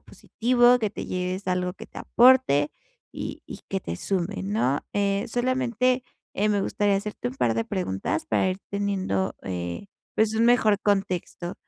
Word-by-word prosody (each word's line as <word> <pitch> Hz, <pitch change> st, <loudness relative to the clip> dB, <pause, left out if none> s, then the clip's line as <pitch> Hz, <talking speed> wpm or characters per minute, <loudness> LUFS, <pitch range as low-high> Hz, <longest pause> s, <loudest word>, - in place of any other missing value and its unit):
positivo, 245 Hz, +1 st, +2 dB
que 215 Hz, -3 st, -1 dB
te -, -, -6 dB
lleves 185 Hz, +1 st, -3 dB
algo 180 Hz, 0 st, -1 dB
que -, -, -10 dB
te -, -, -10 dB
aporte 240 Hz, -, +4 dB, 0.4 s
y -, -, -6 dB
y -, -, -9 dB
que 195 Hz, -, -1 dB
te 85 Hz, -, -5 dB
sume, 190 Hz, -, -2 dB
¿no? 190 Hz, -, 0 dB
Eh, 200 Hz, 0 st, 0 dB
solamente, 255 Hz, 0 st, +1 dB, 0.3 s
eh, 210 Hz, +2 st, +1 dB
me 205 Hz, -1 st, +2 dB
gustaría 205 Hz, -1 st, +1 dB
hacerte 200 Hz, -, -4 dB
un 130 Hz, -, -8 dB
par 120 Hz, -3 st, +1 dB
de 115 Hz, 0 st, 0 dB
preguntas 160 Hz, -, -2 dB
para 190 Hz, -, +2 dB
ir 185 Hz, -, -4 dB
teniendo, 195 Hz, -, -1 dB
eh, 90 Hz, -, -5 dB, 0.3 s
pues 220 Hz, 0 st, +2 dB
un 225 Hz, -, +3 dB
mejor 220 Hz, -4 st, +4 dB
contexto. 185 Hz, -3 st, -1 dB
200 Hz, 165 wpm, -25 LUFS, 180-220 Hz, 0.4 s, aporte